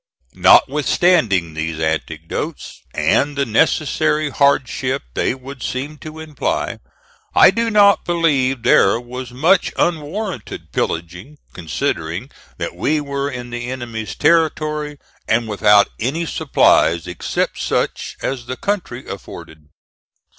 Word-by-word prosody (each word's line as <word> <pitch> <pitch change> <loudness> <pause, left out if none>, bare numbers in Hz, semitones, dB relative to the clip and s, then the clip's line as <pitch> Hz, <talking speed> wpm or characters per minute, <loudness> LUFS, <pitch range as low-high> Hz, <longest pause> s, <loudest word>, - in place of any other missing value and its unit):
Notwithstanding 135 - +3
these 80 0 -4
anecdotes, 80 0 -4
and 145 0 +1
the 140 - +1
necessary 150 +5 +1
hardship 135 -1 +1
they - - 0
would 135 0 -10
seem 145 +4 -4
to 155 0 -9
imply, 155 -2 -3 0.6
I - - +8
do 230 0 0
not 205 -2 +5
believe 140 -8 +1
there 100 +4 +4
was 125 +1 -7
much 160 +9 +2
unwarrantable 170 - -2
pillaging 90 - -4 0.2
considering 85 - -3 0.3
that - - -4
we 155 +1 0
were 140 -1 -3
in 125 -2 -7
the 120 0 -5
enemy's 115 -4 -5
territory 155 -2 +1 0.3
and 115 +1 +1
without 105 -1 +4
any 145 +9 -1
supplies 85 - +2
except 90 -1 -3
such - - -2
as 125 -3 -3
the 130 - -4
country 180 -12 -3
afforded. 80 -1 -10
130 Hz, 115 wpm, -19 LUFS, 110-150 Hz, 0.6 s, I